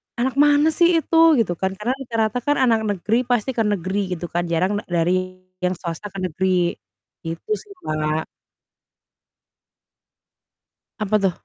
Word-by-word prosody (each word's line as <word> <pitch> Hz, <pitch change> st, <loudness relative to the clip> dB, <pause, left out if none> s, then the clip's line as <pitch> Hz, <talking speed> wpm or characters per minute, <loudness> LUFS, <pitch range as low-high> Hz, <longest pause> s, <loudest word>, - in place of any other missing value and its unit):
"Anak 260 Hz, +3 st, -1 dB
mana 295 Hz, +2 st, +5 dB
sih 340 Hz, 0 st, +3 dB
itu?" 325 Hz, -1 st, +5 dB
gitu 190 Hz, -6 st, +1 dB
kan. 190 Hz, 0 st, -1 dB
Karena 215 Hz, +5 st, -2 dB
rata-rata 230 Hz, -2 st, -1 dB
kan 290 Hz, +4 st, 0 dB
anak 230 Hz, -4 st, +3 dB
negeri 220 Hz, +5 st, 0 dB
pasti 245 Hz, 0 st, +1 dB
ke 235 Hz, -, -1 dB
negeri 190 Hz, -1 st, -1 dB
gitu 175 Hz, 0 st, -7 dB
kan, 175 Hz, 0 st, -1 dB
jarang 185 Hz, +5 st, 0 dB
da -, -, -11 dB, 0.2 s
dari 185 Hz, +1 st, -1 dB, 0.2 s
yang 180 Hz, 0 st, 0 dB
swasta 170 Hz, +3 st, -6 dB
ke 195 Hz, -, -6 dB
negeri 180 Hz, 0 st, +1 dB, 0.5 s
gitu 165 Hz, -, -6 dB
sih, 415 Hz, -, -15 dB, 0.2 s
Mbak. 155 Hz, 0 st, -1 dB, 2.7 s
Apa 215 Hz, 0 st, 0 dB
tuh? 195 Hz, -2 st, +2 dB
205 Hz, 145 wpm, -22 LUFS, 180-245 Hz, 2.7 s, mana